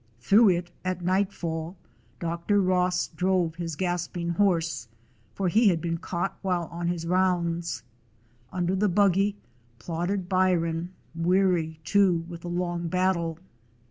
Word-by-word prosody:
Through 200 - +5
it 175 -1 0
at 185 -1 -2
night 190 +2 +2
fall 165 0 -4 0.4
Dr. 170 +4 0
Ross 180 -1 +1
drove 180 0 +1
his 165 -2 -4
gasping 175 0 -2
horse, 170 -7 +1 0.5
for 195 - 0
he 215 +6 +4
had 175 -4 +3
been 165 0 -2
caught 175 +2 -3
while 180 -3 -1
on 170 0 -3
his 170 -1 -2
rounds. 175 -1 0 0.7
Under 180 0 0
the 205 +2 +2
buggy 195 +1 +3 0.4
plodded 175 +8 -3
Byron, 175 -2 +1 0.2
weary, 170 -2 +1
too, 180 -2 +3
with 170 -1 -8
the 175 - -6
long 175 -1 -2
battle. 170 -2 0
175 Hz, 135 wpm, -27 LUFS, 170-185 Hz, 0.7 s, Through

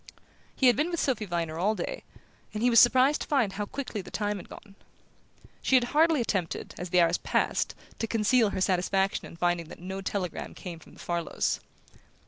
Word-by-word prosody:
He 265 - +1
had 245 -2 +7
been 305 +4 0
with 340 -2 -2
Sophy 240 -6 0
Viner 165 -3 -3
all 210 +5 +2
day, - - -4 0.5
and 215 - -2
he 245 - +4
was 230 - +7
surprised 260 +4 +5
to - - -4
find 250 -9 +1
how 205 +1 -3
quickly 255 -6 -5
the - - -11
time 210 -1 -2
had 185 - -11
gone. 200 - -12 0.9
She 265 - +3
had 255 - +5
hardly 320 0 +4
attempted, 190 -7 -2
as 180 - -5
the 180 - +3
hours 170 0 +3
passed, - - 0 0.2
to 225 - -1
conceal 225 +1 +3
her 190 - -3
satisfaction 190 +1 +1
on - - -12
finding 175 -1 0
that - - -10
no 190 +2 -5
telegram 190 -3 -4
came 175 -4 -8
from - - -17
the - - -17
Farlows. 170 -1 -1
205 Hz, 200 wpm, -28 LUFS, 180-245 Hz, 0.9 s, had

